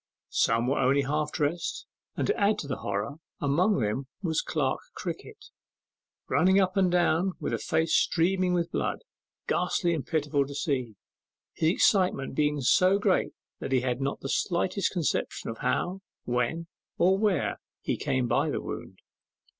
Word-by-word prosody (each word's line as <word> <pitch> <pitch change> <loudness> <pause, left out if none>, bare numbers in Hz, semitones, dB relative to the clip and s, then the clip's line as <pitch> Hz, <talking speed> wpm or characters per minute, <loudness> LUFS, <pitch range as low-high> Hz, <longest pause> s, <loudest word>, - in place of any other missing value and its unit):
Some 115 +1 +2
were 135 +3 +1
only 135 +2 +3
half 150 +2 -1
dressed, 155 +3 -2 0.3
and, - - 0
to - - +1
add 205 0 +2
to 150 - -5
the 130 - -3
horror, 100 +9 -3 0.2
among 165 +7 +2
them 110 +6 -1 0.2
was 160 -3 +1
Clerk - - -1 0.2
Crickett, 425 -2 -7 0.8
running 190 +2 +4
up 185 -1 +1
and 190 -2 +3
down 175 +1 +2
with - - -3
a - - -1
face 160 0 0
streaming 180 +1 +2
with 170 -1 -1
blood, - - -2 0.4
ghastly 175 -2 +1
and 155 -5 -2
pitiful 150 -3 0
to 140 - -8
see, 130 -7 -2 0.6
his 160 - +2
excitement 185 -6 +2
being 150 0 +1
so 185 +10 +4
great 200 -3 +1 0.3
that - - -5
he 130 -2 +3
had 125 0 -1
not 140 +1 -2
the - - -4
slightest 185 +4 0
conception 170 -9 -1
of 115 - -9
how, 175 +9 -1 0.2
when, 125 +7 -1 0.3
or 185 +2 +4
where 200 -8 +1 0.2
he - - 0
came 130 -2 0
by 135 +6 +1
the - - -1
wound. - - -7
160 Hz, 160 wpm, -28 LUFS, 135-185 Hz, 0.8 s, running